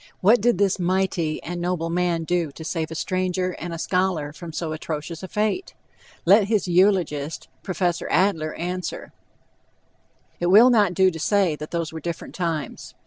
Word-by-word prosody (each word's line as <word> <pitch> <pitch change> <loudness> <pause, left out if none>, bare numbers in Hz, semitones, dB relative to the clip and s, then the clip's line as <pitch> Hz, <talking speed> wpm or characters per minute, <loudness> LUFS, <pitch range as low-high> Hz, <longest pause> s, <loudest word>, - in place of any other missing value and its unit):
What 210 +4 +5
did 240 -3 +3
this 195 -1 +2
mighty 180 -3 0
and 175 +1 -5
noble 175 -2 -1
man 175 -1 0
do 170 -2 -1
to 160 - -9
save 160 0 -3
a 160 - -6
stranger 185 +1 -1
and 175 +1 -5
a 165 - -4
scholar 175 -4 -1
from 165 +1 -8
so 160 0 -3
atrocious 155 +1 -5
a 190 - -6
fate? 215 - -2 0.5
Let 200 +4 +6
his 205 -3 0
eulogist, 175 -5 +1
Prof. 175 -2 -1
Adler, 165 -5 +1
answer. 180 +1 -5 1.3
It 175 - 0
will 220 +7 +7
not 205 -6 +3
do 190 0 +4
to 165 - -7
say 190 -2 +2
that 150 +1 -8
those 165 -2 -3
were 160 - -5
different 170 +1 -5
times. 165 -5 -4
175 Hz, 170 wpm, -23 LUFS, 165-190 Hz, 1.3 s, will